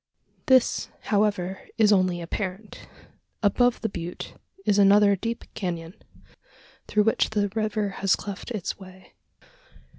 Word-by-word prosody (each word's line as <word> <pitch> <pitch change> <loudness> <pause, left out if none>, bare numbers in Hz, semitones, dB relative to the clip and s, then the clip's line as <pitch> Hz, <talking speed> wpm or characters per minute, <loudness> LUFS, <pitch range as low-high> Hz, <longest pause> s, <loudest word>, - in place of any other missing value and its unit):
This, 260 -2 +3 0.2
however, 200 -3 +1
is 215 -2 +5
only 185 -3 +2
apparent. 190 +4 -6 0.6
Above 245 +4 +3
the 225 - 0
butte 175 -3 -6 0.3
is 205 0 +3
another 200 0 +6
deep 230 +4 -4
canon, 170 -3 -4 0.9
through 210 0 +2
which 225 - +2
the 205 -2 0
river 215 0 -1
has 195 -1 +4
cleft 200 +3 -7
its 215 -6 -4
way. 185 -1 -14
205 Hz, 120 wpm, -25 LUFS, 185-215 Hz, 0.9 s, another